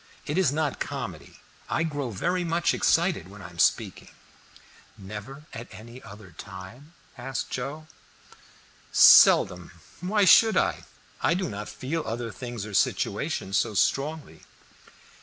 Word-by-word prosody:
It 150 - -3
is 185 -7 +2
not 150 -1 -2
comedy. 110 - -6 0.3
I - - 0
grow 145 -5 -3
very 175 - -1
much 170 0 0
excited 170 - +1
when 100 +2 -13
I 90 - -10
am 85 - -15
speaking." - - +1 0.9
"Never 105 +9 -9
at 115 +1 -8
any 115 +4 -12
other 100 -2 -13
time?" 95 - -11 0.3
asked 135 +2 -5
Joe. 140 +5 -5 1.1
"Seldom; 90 -2 +6 0.3
why 200 +4 +1
should 220 +4 +6
I? - - 0 0.4
I 170 - +2
do 185 0 -2
not 105 +1 -6
feel 160 +6 -4
other 115 -1 -4
things 120 -3 -7
or 105 - -9
situations 95 +1 0
so 110 - -2
strongly." 140 - -1
125 Hz, 135 wpm, -26 LUFS, 105-160 Hz, 1.1 s, Seldom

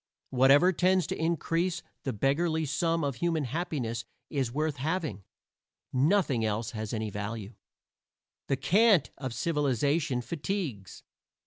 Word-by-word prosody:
Whatever 135 +8 +5
tends 185 +1 +3
to - - -3
increase 165 +2 0 0.2
the 135 - 0
beggarly 155 +8 +1
sum 165 +3 0
of 140 -4 -2
human 165 -3 0
happiness 130 -5 -3 0.3
is 135 -5 -1
worth 150 +2 -1
having; 150 - -2 0.7
nothing 140 - +2
else 110 +1 -1
has 110 -2 -5
any 110 -2 -2
value. 105 +1 -5 0.9
The 135 - +1
cant 190 - +4
of 130 -2 -4
civilization 145 -1 0
fatigues. 150 - -4
140 Hz, 120 wpm, -29 LUFS, 120-165 Hz, 0.9 s, Whatever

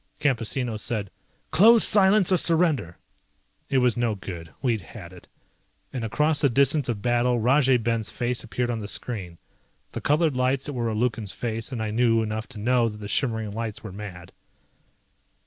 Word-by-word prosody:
Campesino 125 -3 -1
said, 105 -2 -3 0.4
"Close 225 +5 +6
silence 195 -1 +4
or 185 - +5
surrender." 160 - +1 0.7
It 135 - +1
was 125 -3 +3
no 120 -3 0
good. 85 -4 -8
We'd 120 -6 0
had 90 0 -11
it. 90 - -14 0.7
And 125 -3 -3
across 150 +7 +1
the 140 - +4
distance 140 +2 +2
of 105 -4 -3
battle 120 0 +2
Rajay 130 +2 +4
Ben's 115 -1 -1
face 120 0 -2
appeared 120 +1 -2
on 115 - -3
the 105 - -6
screen. 95 -7 -4 0.5
The - - -6
colored 150 -1 +2
lights 130 +1 0
that 145 - -3
were 120 -3 -1
a 110 - -2
Lukan's 110 -3 -1
face 115 +1 -4
and 115 -4 -3
I 110 - -3
knew 115 0 +2
enough 110 +1 -4
to - - -11
know 120 +2 +2
that 105 - -9
the 105 -1 -7
shimmering 110 -3 -1
lights 110 0 -5
were 110 - -7
mad. 95 -3 -9
120 Hz, 180 wpm, -25 LUFS, 110-130 Hz, 0.7 s, Close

